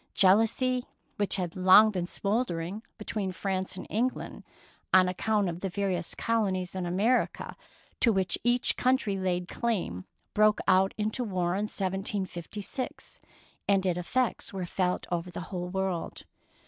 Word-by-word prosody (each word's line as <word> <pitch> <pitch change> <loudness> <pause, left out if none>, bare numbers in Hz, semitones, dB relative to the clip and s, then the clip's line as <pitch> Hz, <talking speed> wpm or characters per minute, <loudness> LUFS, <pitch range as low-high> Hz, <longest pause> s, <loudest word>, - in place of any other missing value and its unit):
Jealousy, 225 +6 +3 0.3
which 205 -1 +2
had 180 -4 -3
long 190 +4 +7
been 180 -3 -2
smouldering 200 -2 -2 0.2
be 210 - -9
tween 200 -4 -2
France 190 0 -2
and - - -6
England 245 +4 -2 0.5
on 185 -1 +6
account 205 +2 +1
of 170 0 -4
the 195 - -3
various 185 -3 -2
colonies 195 -6 0
in 185 -2 -3
America 210 +8 0 0.4
to 235 - +4
which 190 -3 +1
each 240 +1 +3
country 255 -6 +2
laid 180 -2 -1
claim, 185 - -2 0.3
broke 215 0 +4
out 190 +1 +4
into 215 +4 -1
war 185 -5 -1
in 200 +3 0
1756, 195 +3 -4 0.5
and 195 -1 +3
its 180 -1 +1
effects 245 +7 -1
were 190 -3 -4
felt 180 +1 -1
over 175 +1 -2
the - - -6
whole 180 -1 -3
world. 190 -2 -3
190 Hz, 145 wpm, -29 LUFS, 180-215 Hz, 0.5 s, long